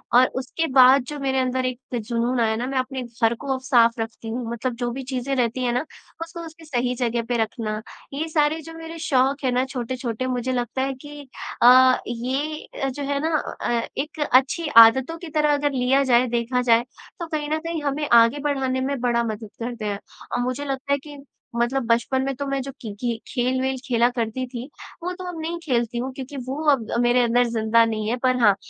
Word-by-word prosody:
और 250 +1 +8
उसके 325 +5 -2
बाद 260 0 +7
जो 295 - -5
मेरे 265 -1 0
अंदर 255 0 0
एक 255 -1 -2 0.2
जुनून 235 +2 -1
आया 220 -1 +2
ना, 235 +2 -2
मैं 270 0 -2
अपने 260 0 -2
घर 235 -1 0
को 270 -2 -1
साफ़ 235 -3 +3
रखती 225 0 -6
हूँ। 240 +3 -3
मतलब 235 +1 -3
जो 240 0 -2
भी 265 +2 -5
चीज़ें 260 +1 -2
रहती 250 +1 0
हैं 240 -1 +1
ना 250 +6 0 0.4
उसको 335 +1 -9
उसकी 325 0 -12
सही 250 -4 -1
जगह 235 -1 0
पर 240 -2 +1
रखना। 215 -1 -3 0.3
ये 305 +4 -2
सारे 310 0 +1
जो 325 +1 -10
मेरे 325 0 -8
शौक़ 270 +1 +2
हैं 255 - +2
ना 250 +1 +1
छोटे-छोटे 255 -1 -4
मुझे 250 0 -1
लगता 245 +1 -2
है 270 +1 -1
कि 290 +1 -11 0.3
अ, 255 +1 +7
ये 265 +6 -3 0.2
जो 285 +2 -5
है 280 0 -1
ना 320 0 0 0.3
अ, 235 -1 +1 0.2
एक 305 +3 -4
अच्छी 270 +6 +3
आदतों 260 +8 +7
की 335 0 -9
तरह 300 -1 +2
अगर 290 0 +1
लिया 265 +1 +2
जाए, 250 -1 +4
देखा 240 +1 0
जाए, 235 -1 +4 0.4
तो 340 - -4
कहीं 300 -2 -3
न 310 +1 0
कहीं 330 -1 -4
हमें 290 +1 -1
आगे 230 +4 +6
बढ़ाने 270 -3 -1
में 275 0 -1
बड़ा 240 -1 +2
मदद 220 -1 -5
करते 235 -2 -4
हैं। 200 -1 -2 0.3
और - - -1
मुझे 255 +3 -3
लगता 275 0 -2
है 280 - +1
कि 295 -1 -10 0.4
मतलब 240 +3 +1
बचपन 235 +3 +2
में 275 - -1
तो 280 - -4
मैं 275 -1 -1
जो 275 - -6
कि 220 -5 -6
कि 235 -2 -2
खेल-वेल 260 0 0
खेला 240 -2 +3
करती 240 +1 -2
थी, 245 -1 -6 0.4
वो 360 - -2
तो 370 0 -8
अब 340 -2 -6
नहीं 335 +2 -3
खेलती 240 -5 0
हुँ 260 +2 -2
क्योंकि 270 +1 -7
वो 265 - -3 0.2
अब 250 -6 +1 0.2
मेरे 245 +1 +4
अंदर 240 +1 +3
ज़िंदा 230 0 +3
नहीं 215 -1 -2
है। 245 - 0
पर 255 0 +1
हाँ, 205 -4 +6
255 Hz, 215 wpm, -23 LUFS, 235-280 Hz, 0.4 s, और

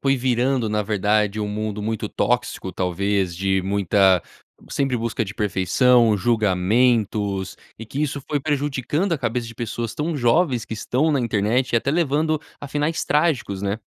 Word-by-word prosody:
foi 135 0 +2
virando, 125 -1 +1
na 105 0 0
verdade, 105 0 +1
um 105 - -2
mundo 105 0 -3
muito 110 0 -2
tóxico? - - -1
Talvez 95 0 -1
de 95 +1 0
muita 95 -2 +3 0.5
sempre 135 -3 0
busca 115 -1 -2
de 100 +2 -8
perfeição, 110 +4 +3
julgamentos, 105 -1 +1 0.2
e 115 - -7
que 135 - -5
isso 145 -1 -2
foi 150 - 0
prejudicando 145 +4 -1
a 155 - 0
cabeça 120 -1 -2
de 115 - -10
pessoas 115 0 -4
tão 155 +1 -2
jovens 125 -1 +2
que 110 - -6
estão 130 +8 0
na 140 - +1
internet 115 +3 0
e - - +4
até 125 +4 0
levando 155 0 +1 0.2
a 145 - -6
finais 150 +3 -1
trágicos, 145 - 0
né? 100 +2 -1
115 Hz, 165 wpm, -22 LUFS, 100-135 Hz, 0.5 s, e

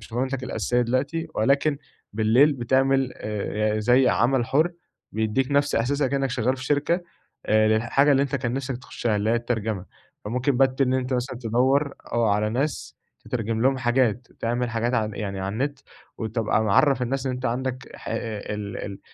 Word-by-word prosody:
شغلانتك 130 +4 -3
الأساسية 125 -1 0
دلوقتي 140 +7 -1
ولكن 140 +5 +2 0.3
بالليل 115 +7 +4
بتعمل 135 +1 +2
آآ، 105 0 -2
زي 125 +4 +4
عمل 120 0 +2
حُر 160 +6 +2 0.4
بيدّيك 110 +5 0
نفس 145 0 +2
أحساسك 135 +4 +1
كإنك 135 -1 0
شغّال 125 +1 0
في 130 - -7
شركة 150 +6 +1 0.4
آآ، 110 0 +4
الحاجة 135 +6 +3
اللي 135 0 +4
أنت 140 0 -1
كان 120 -2 -2
نفسك 135 -2 -3
تخشها 120 -3 -2
اللي 105 +2 0
هي 115 - +3
الترجمة، 110 -5 -2 0.4
فممكن 125 +5 0
بت 135 0 +2
إن 130 -1 +3
أنت 130 0 -1
مثلًا 125 0 -3
تدوّر، 130 +5 +1 0.2
آه 115 -3 +2
على 105 +1 +1
ناس 135 +7 -2 0.3
تترجم 115 -1 -2
لهم 135 0 +3
حاجات 120 -2 +1
تعمل 120 +1 -1
حاجات 115 +2 -1
ع 110 -2 +1
يعني 100 -3 -4
على 95 +1 -3
النت، 140 +4 -2 0.4
وتبقى 110 -1 0
معرف 130 +6 +3
الناس 135 +2 -2
إن 130 - 0
أنت 125 +1 -3
عندك 130 +2 -3
ح - - -10
ال 105 -2 -4
ال 100 -1 -7
125 Hz, 170 wpm, -24 LUFS, 110-135 Hz, 0.4 s, بالليل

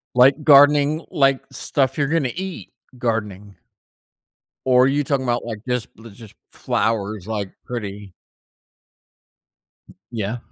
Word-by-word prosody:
Like 135 +4 +5
gardening 145 +2 +5
like 135 -2 +2
stuff 135 -2 -1
you're 140 -2 +1
gonna 150 -5 0
eat 190 +1 -6 0.3
gardening. 105 -5 -3 1.1
Or, 125 0 +5
you 145 +2 +1
talking 135 -1 -1
'bout, 120 -1 -1
like, 115 -3 -5
just 125 -3 -2
li 115 +1 -12
just 110 0 -14 0.2
flowers, 105 -2 -2
like, 105 -4 -4
pretty? 105 -5 -7 2.0
Yeah. 110 0 -3
125 Hz, 115 wpm, -21 LUFS, 105-140 Hz, 2.0 s, Like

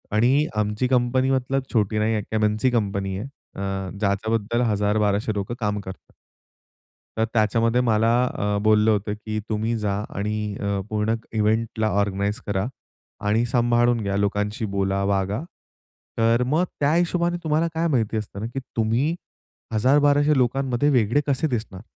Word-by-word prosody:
आणि 130 +7 +3
आमची 105 +3 0
कंपनी 130 +1 +2
मतलब 135 +1 0
छोटी 110 -2 +1
नाही 110 +1 +1
आहे, 110 - 0
एक - - -13
"एम-एन-सी" 110 +3 +2
कंपनी 100 -4 -1
आहे. 105 +7 -5 0.3
अ, 95 -1 -3
ज्याच्याबद्दल 110 +3 0
1000-1200 105 +1 +1
लोकं 100 +3 -3
काम 105 -2 -1
करतात. 95 -1 -10 1.1
तर 110 - +3
त्याच्यामध्ये 115 +2 +2
मला 115 -2 +2 0.2
अ, 105 -4 -2
बोललं 110 0 +4
होतं 105 0 0
की, 110 0 -5
"तुम्ही 110 +2 -1
जा 105 -2 -1 0.2
आणि 105 +1 -2
अ, 100 -1 -1
पूर्ण 110 +1 0 0.2
इव्हेंटला 110 0 +1
ऑर्गनाइज 100 +3 -1
करा 100 0 -1 0.6
आणि 110 +3 +2
सांभाळून 120 0 +2
घ्या, 100 -1 -1
लोकांशी 105 +2 -1
बोला, 100 0 0
वागा." 100 +2 0 0.8
तर 115 +2 +3
मग 155 +7 +2 0.2
त्या 145 +1 +3
हिशोबाने 175 0 +1
तुम्हाला 155 +1 +2
काय 165 +1 0
माहिती 115 -7 0
असतं 105 -2 -5
ना, 110 - -3
की 125 +3 -5 0.2
तुम्ही 115 +8 +1 0.6
1000-1200 145 +5 +3
लोकांमध्ये 130 +1 +1
वेगळे 120 0 +3
कसे 140 +2 +1
दिसणार. 110 -7 -4
110 Hz, 150 wpm, -23 LUFS, 105-125 Hz, 1.1 s, बोललं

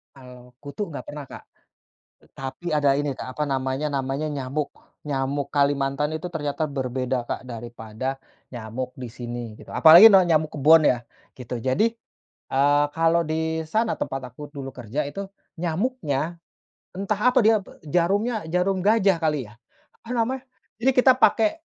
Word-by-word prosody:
Kalau 125 -1 -14
kutu 145 +9 -5
enggak - - -6
pernah, 145 -1 -7
Kak. - - -11 0.8
E - - -24
tapi 135 +6 -6
ada 145 -3 +3
ini, 140 -1 -1
Kak, 130 - -7
apa 150 +1 -2
namanya 135 +2 -1
namanya 140 +2 -2
nyamuk. 140 +1 -3 0.4
Nyamuk 140 0 -1
Kalimantan 140 +1 0
itu 160 +3 -4
ternyata 155 -2 -3
berbeda, 130 -2 -2
Kak, 125 - -5
daripada 120 +2 -6 0.3
nyamuk 120 +2 -5
di 125 -2 -8
sini, 120 -1 -7
gitu. - - -13
Apalagi 175 +7 +9
na 190 - +8
nyamuk 160 -3 +1
kebon 155 +2 +5
ya 125 -4 +3 0.3
gitu. 125 -1 -7
Jadi, 135 - 0 0.5
eee, 145 +2 +3
kalau 165 +2 +2
di 160 0 -2
sana 220 +3 +1
tempat 130 -3 -5
aku 145 +2 -9
dulu 135 -3 -8
kerja 125 +5 -4
itu 195 +7 -6 0.3
nyamuknya, 170 - -2 0.5
entah 200 +2 -2
apa 250 -2 +4
dia 220 -1 +5
b 190 - -15 0.2
jarumnya, 195 +7 0
jarum 180 +3 0
gajah 195 -2 +3
kali 150 -9 -1
ya? 115 - -21 0.4
Apa 245 +2 -6
namanya? 255 +3 -1 0.3
Jadi 265 +3 +3
kita 255 +1 +6
pakai 255 +2 +3
145 Hz, 155 wpm, -24 LUFS, 130-175 Hz, 0.8 s, Apalagi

